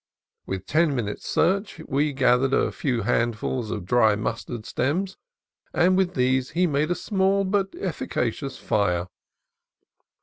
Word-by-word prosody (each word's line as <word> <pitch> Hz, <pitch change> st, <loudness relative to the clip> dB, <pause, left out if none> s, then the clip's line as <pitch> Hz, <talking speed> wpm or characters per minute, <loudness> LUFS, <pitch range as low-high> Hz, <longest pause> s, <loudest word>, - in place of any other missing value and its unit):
With 95 Hz, -1 st, -4 dB
ten 155 Hz, -, +2 dB
minutes' 105 Hz, -5 st, -4 dB
search 195 Hz, +4 st, +1 dB
we 145 Hz, +3 st, +1 dB
gathered 135 Hz, 0 st, +3 dB
a -, -, +1 dB
few 125 Hz, -6 st, -1 dB
handfuls 120 Hz, 0 st, -1 dB
of 95 Hz, -, -4 dB
dry 110 Hz, +1 st, +4 dB
mustard 110 Hz, +1 st, -4 dB
stems, 180 Hz, +9 st, -1 dB, 0.6 s
and 180 Hz, +2 st, +4 dB
with 185 Hz, -1 st, +1 dB
these 130 Hz, 0 st, +1 dB
he 180 Hz, +3 st, +1 dB
made 150 Hz, -1 st, 0 dB
a 175 Hz, -, +1 dB
small 195 Hz, 0 st, +1 dB
but 195 Hz, 0 st, 0 dB
efficacious 135 Hz, -, -3 dB
fire. 90 Hz, -4 st, 0 dB
135 Hz, 135 wpm, -24 LUFS, 115-180 Hz, 0.6 s, dry